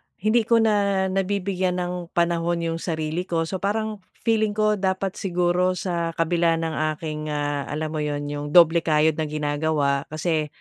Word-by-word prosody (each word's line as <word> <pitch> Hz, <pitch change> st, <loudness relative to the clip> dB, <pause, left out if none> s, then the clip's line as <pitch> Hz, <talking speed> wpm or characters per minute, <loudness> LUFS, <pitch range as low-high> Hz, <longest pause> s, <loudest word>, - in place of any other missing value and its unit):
hindi 220 Hz, +3 st, +1 dB
ko 235 Hz, -, +4 dB
na 200 Hz, -4 st, +2 dB
nabibigyan 190 Hz, -1 st, -1 dB
ng 180 Hz, -1 st, -3 dB
panahon 170 Hz, 0 st, +1 dB
yung 165 Hz, 0 st, -2 dB
sarili 160 Hz, +1 st, -3 dB
ko. 165 Hz, -1 st, 0 dB
So, 185 Hz, +3 st, -4 dB
parang 215 Hz, +2 st, -2 dB, 0.2 s
feeling 220 Hz, -2 st, +1 dB
ko 215 Hz, -1 st, +2 dB
dapat 190 Hz, 0 st, -1 dB
siguro 180 Hz, 0 st, +1 dB
sa 170 Hz, -2 st, -2 dB
kabila 165 Hz, 0 st, +2 dB
ng 165 Hz, 0 st, -2 dB, 0.2 s
aking, 155 Hz, -1 st, -5 dB
ah, 145 Hz, -1 st, -2 dB
alam 155 Hz, +1 st, -3 dB
mo 155 Hz, -, -3 dB
'yon? 145 Hz, -1 st, -2 dB
Yung 145 Hz, 0 st, -4 dB
doble 170 Hz, -1 st, +7 dB
kayod 155 Hz, -1 st, +2 dB
na 155 Hz, -, 0 dB
ginagawa, 145 Hz, -1 st, 0 dB
kasi, 155 Hz, 0 st, -1 dB
170 Hz, 165 wpm, -24 LUFS, 155-190 Hz, 0.2 s, doble